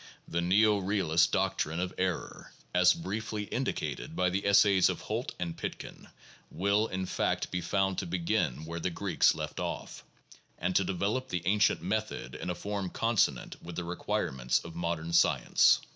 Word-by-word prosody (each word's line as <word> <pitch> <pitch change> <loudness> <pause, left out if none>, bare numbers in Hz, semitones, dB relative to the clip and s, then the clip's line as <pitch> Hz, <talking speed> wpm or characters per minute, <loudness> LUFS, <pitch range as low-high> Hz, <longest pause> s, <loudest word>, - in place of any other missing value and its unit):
The 85 - -1
neo 105 +4 +4
realist 90 -4 +2
doctrine 80 +2 0
of 90 0 -2
error 90 -2 -3 0.2
(as 90 0 +5
briefly 105 +4 -4
indicated 135 +7 -3
in 90 -1 +3
the 100 +2 -1
essays 100 -1 +5
of - - -3
Holt - - -4
and 85 -2 -3
Pitkin) - - -7 0.4
will, 100 +5 +1
in 95 -2 -3
fact, - - -1
be 90 - -1
found 95 +1 0
to - - -4
begin 85 - -1
where 85 +1 -5
the 90 - -1
Greeks 90 0 +2
left - - -5
off, - - -5 0.5
and 90 +1 -2
to 95 - +4
develop 100 +8 -1
the 90 -2 -2
ancient 105 0 +2
method 105 - -3
in - - -5
a 90 - -1
form 100 -1 -3
consonant 110 - 0
with 85 0 -8
the 90 - -3
requirements 65 -7 -1
of 85 - -8
mod 85 0 -1
ern 85 +1 -6
science. 85 - +4
90 Hz, 170 wpm, -30 LUFS, 85-100 Hz, 0.5 s, as